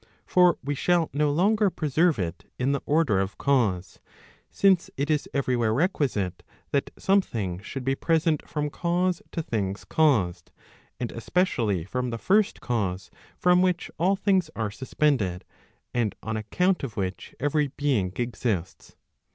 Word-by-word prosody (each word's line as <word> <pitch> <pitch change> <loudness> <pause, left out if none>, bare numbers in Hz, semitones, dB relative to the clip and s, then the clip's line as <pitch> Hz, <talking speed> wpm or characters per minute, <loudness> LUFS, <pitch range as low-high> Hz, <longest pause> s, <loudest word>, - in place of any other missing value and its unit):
For 180 -2 +4
we 145 +2 -1
shall 170 +3 +1
no 150 0 +2
longer 200 +7 +3
preserve 160 -1 +1
it 85 -3 -4
in 130 +2 +1
the 140 - -1
order 145 -10 +3
of 95 0 -2
cause; 105 -10 0 0.5
since 190 -3 +3
it 145 +3 0
is 150 -1 0
every 130 -2 0
where 115 -2 +1
requisite 125 - 0 0.3
that 140 - 0
something 115 - 0
should 130 +6 -6
be 135 +1 +1
present 160 +1 0
from 150 -1 -2
cause 175 +2 0
to 165 - -3
things 100 -7 -3
caused, 120 - +1 0.2
* - - -31
and 120 - -3
especially 115 - 0
from 125 +5 -2
the 115 - -3
first 200 - +2
cause 95 -6 -2 0.3
from 180 0 +4
which 180 -2 0
all 185 +4 +3
things 190 -4 +1
are 110 -2 -2
suspended, 125 -7 0 0.5
and 115 -4 0
on 110 0 -3
account 180 - 0
of 120 -6 -5
which 95 -1 -4
every 145 +1 +1
being 135 -9 0
exists. 115 -7 -3
140 Hz, 150 wpm, -26 LUFS, 110-170 Hz, 0.5 s, For